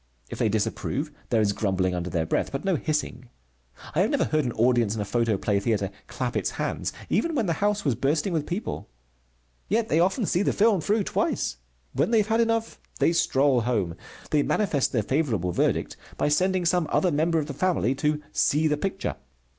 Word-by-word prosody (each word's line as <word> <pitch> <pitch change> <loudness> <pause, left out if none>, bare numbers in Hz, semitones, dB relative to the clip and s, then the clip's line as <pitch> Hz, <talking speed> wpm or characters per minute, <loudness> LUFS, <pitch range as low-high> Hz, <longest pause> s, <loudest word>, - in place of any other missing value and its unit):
If - - -6
they 110 - +2
disapprove, 130 +7 -2 0.2
there 115 -2 +3
is 100 -1 +2
grumbling 95 -3 0
under 90 0 -3
their 85 -2 -1
breath, - - -1
but 135 +5 -4
no 190 -2 +2
hissing. 150 -5 -2 0.6
I - - 0
have - - +2
never - - +1
heard 155 -2 +1
an 120 - -1
audience 115 -2 +2
in 110 - -2
a - - -2
photoplay 105 -2 +1
theatre 100 -2 0 0.2
clap 125 -1 -3
its - - 0
hands - - -3 0.2
even 335 -1 0
when 235 - +1
the 170 - +1
house 205 -1 +1
was 140 - +3
bursting 150 - 0
with 155 -3 -1
people. 180 - -4 0.8
Yet 220 +2 0
they 160 - +3
often 190 +6 +2
see 180 - +1
the - - +1
film 205 -4 +3
through 210 +6 +1
twice. - - -1 0.4
When 135 - +1
they 230 - +3
have 215 0 +2
had 225 +1 +3
enough, 230 0 0 0.2
they 170 - +3
stroll 135 -5 +3
home. 110 -8 0 0.4
They 150 - +4
manifest 160 -6 +1
their 110 -4 +1
favorable 115 - 0
verdict - - 0 0.2
by - - +1
sending 185 +4 +2
some 170 -1 +2
other 180 - +2
member 165 +3 +1
of 155 - 0
the 145 - -6
family 165 -5 +1
to 150 +2 -1
"see 150 +2 +2
the 150 -1 +2
picture." 195 +4 -3
150 Hz, 200 wpm, -26 LUFS, 115-185 Hz, 0.8 s, They